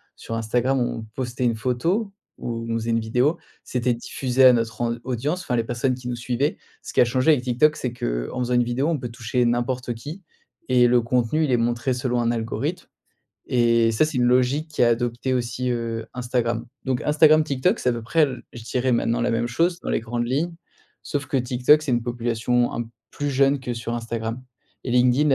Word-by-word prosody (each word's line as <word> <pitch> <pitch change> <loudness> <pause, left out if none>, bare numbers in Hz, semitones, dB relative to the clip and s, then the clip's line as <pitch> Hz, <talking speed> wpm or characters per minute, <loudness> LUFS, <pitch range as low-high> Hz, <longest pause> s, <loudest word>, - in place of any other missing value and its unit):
sur 115 - -6
Instagram 120 +4 0
on 115 -2 -2
postait 125 -1 -3
une 115 -2 +2
photo, 165 - -1 0.3
ou 115 -1 -4
on - - 0
faisait 115 0 -1
une 115 - +2
vidéo. 125 +9 +1 0.3
C'était 125 -1 0
diffusé 130 +2 +1
à 125 - +9
notre 115 -1 -1
en 115 0 0
audience, 135 +8 -2
enfin 125 - -2
les 115 - +1
personnes 120 +3 -1
qui 125 -1 -9
nous 120 - -2
suivaient. 125 - -1 0.2
Ce - - -9
qui - - +4
a - - +6
changé 130 +6 +3
avec 130 -5 +2
TikTok, 130 +5 +3
c'est 125 - -3
qu'en - - -3
faisant 125 0 -1
une 120 0 +4
vidéo, 125 +5 -1
on 165 - +1
peut 120 - -5
toucher 120 +1 -1
n'importe 120 +1 -1
qui 150 +11 -8 0.5
et 125 -1 +5
le 120 0 +4
contenu, 125 +6 +1
il 135 - -1
est 120 - +4
montré 120 +2 0
selon 125 -1 -1
un 120 0 +1
algorithme 115 -1 -3 0.6
et 115 -2 +3
ça, 110 - +3
c'est 155 -3 -3
une 120 - +3
logique 130 +6 +2
qu'a 120 - +4
adopté 120 +2 0
aussi, 125 +1 -2
heu, 115 -1 -3
Instagram. 120 -1 -1 0.2
Donc 130 -2 -1
Instagram, 155 +1 +5
TikTok, 135 -4 +1
c'est 125 - +1
à - - 0
peu 115 -1 -5
près, 160 +8 +2
l 130 -3 -5
je 115 - -9
dirais 125 +2 0
maintenant 115 0 +1
la 120 - +1
même 115 +1 0
chose 170 +7 +1
dans - - -4
les - - +1
grandes 120 +1 -3
lignes. 160 +7 -1 0.5
Sauf 145 -1 -3
que 135 - -1
TikTok, 125 +4 +3
c'est 140 - -1
une 120 -1 +1
population 120 0 0
un 115 -1 -4 0.2
plus 145 0 -2
jeune 135 +1 +3
que 125 -1 -4
sur 115 +1 -4
Instagram 115 +1 -4 0.4
et 125 - -3
LinkedIn 125 +4 +4
125 Hz, 215 wpm, -23 LUFS, 115-130 Hz, 0.6 s, à